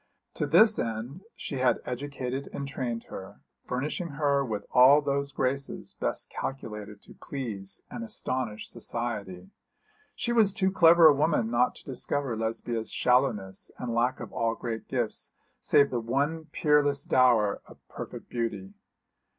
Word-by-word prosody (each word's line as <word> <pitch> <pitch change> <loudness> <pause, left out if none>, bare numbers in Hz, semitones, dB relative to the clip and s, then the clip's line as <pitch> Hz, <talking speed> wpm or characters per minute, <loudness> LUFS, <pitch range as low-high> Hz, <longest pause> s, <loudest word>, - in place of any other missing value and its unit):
To - - -2
this 220 0 +6
end 115 - -4
she 140 - -5
had 130 -1 +2
educated 135 0 -4
and 140 - -5
trained 125 -4 -3
her, 95 - -10 0.3
furnishing 145 +7 -2
her 140 -2 +2
with 105 -5 -4
all 130 +4 +7
those 140 -1 -1
graces 135 +1 -2
best - - -2
calculated 105 -6 -6
to - - -14
please 105 -8 -6
and 235 - -5
astonish 130 - -3
society. 100 -6 -4 0.6
She 240 - -1
was 215 -4 +4
too 190 -2 +2
clever 170 -2 +7
a 155 - +9
woman 145 -6 +1
not 120 +1 +2
to - - -13
discover 135 -1 -2
Lesbia's 115 0 -2
shallowness 110 -7 +1
and 120 -2 -4
lack 120 +2 +1
of - - -8
all 115 0 0
great 115 -2 -5
gifts, 120 -4 -2 0.3
save 140 -1 +4
that 120 - 0
one 140 +8 -1
peerless 145 -2 +2
dower 120 -6 +3
of - - -14
perfect - - -8
beauty. 110 -5 -3
130 Hz, 145 wpm, -28 LUFS, 115-145 Hz, 0.6 s, a